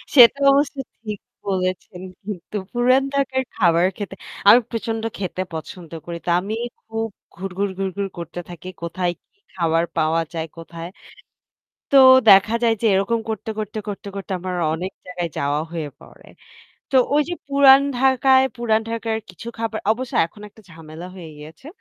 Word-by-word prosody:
সেটা 250 +1 +8
অবশ্য 280 +1 +2 0.3
ঠিক 210 -3 -5 0.3
বলেছেন 185 -1 -2 0.2
কিন্তু। 205 -1 -7 0.2
পুরান 255 +2 +4
ঢাকার 265 -1 0
খাবার 170 -3 +3
খেতে 200 -2 -6 0.3
আমি 230 +4 +10
প্রচন্ড 225 -1 -3
খেতে 185 -1 -3
পছন্দ 165 +1 -8
করি। 170 -1 -5
তা 175 - +1
আমি 205 +4 -3 0.3
খুব 225 0 -3 0.3
ঘুরঘুর, 195 +2 -3
ঘুরঘুর 195 +1 -2
করতে 170 0 -6
থাকি 175 0 -10 0.2
কোথায় 175 +1 -1 0.2
কি 400 - -41 0.2
খাবার 165 -2 +2
পাওয়া 160 +1 +2
যায় 165 -1 -3
কোথায়। 165 0 -8 1.0
তো 280 - +7 0.3
দেখা 195 +3 +7
যায় 230 -1 +4
যে - - 0
এরকম 200 +5 +1
করতে, 220 0 -4
করতে, 215 0 -4
করতে, 205 0 -6
করতে, 195 +1 -6
আমার 185 0 -4 0.2
অনেক 180 +4 -4
জায়গায় 180 -2 -4
যাওয়া 145 +1 0
হয়ে 160 -3 -4
পড়ে। - - -17 0.6
তো - - 0 0.2
ওই 300 - +5
যে - - -1
পুরান 275 -1 +7 0.2
ঢাকায় 265 0 +4
পুরান 225 -2 +1
ঢাকার 225 -1 -2
কিছু 185 +6 -11
খাবার 225 -1 -2
অবশ্য 245 +2 -4
এখন 190 +5 -14
একটা 220 - -19
ঝামেলা 160 +1 -10
হয়ে 170 -4 -9
গিয়েছে। 155 - -12
195 Hz, 155 wpm, -22 LUFS, 170-230 Hz, 1.0 s, আমি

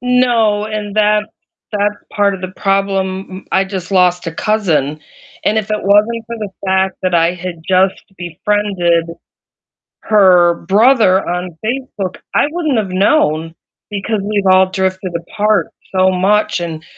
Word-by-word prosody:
No, 240 -4 +2
and 215 -1 -5
that 210 0 +3 0.5
that's 205 0 0 0.2
part 200 -1 +2
of 190 - -8
the 185 0 -6
problem. 195 -1 -1
M 185 +1 -9
I 190 +1 +3
just 190 -2 -6
lost 180 -2 +2
a 165 - -3
cousin, 165 -9 0 0.5
and 215 - +2
if 215 -1 -4
it 210 0 -1
wasn't 215 +3 +2
for 235 0 -6
the 210 -2 -4 0.2
fact 190 0 +1
that 185 -1 0
I 170 +1 +3
had 180 -2 -7
just 190 +1 +2 0.2
befriended 175 -1 0 1.0
her 180 -5 +5
brother 205 -2 +4
on 180 +1 -2 0.2
Facebook, 225 -6 -4 0.2
I - - +3
wouldn't 310 -6 -1
have 200 -4 -2
known, 165 - +1 0.3
because 205 +1 -2
we've 205 -1 -1
all 185 0 +5
drifted 190 -1 -2
apart 210 +5 0 0.3
so 185 0 +4
much, 195 +2 +1
and 165 -2 -5
195 Hz, 150 wpm, -15 LUFS, 185-210 Hz, 1.0 s, her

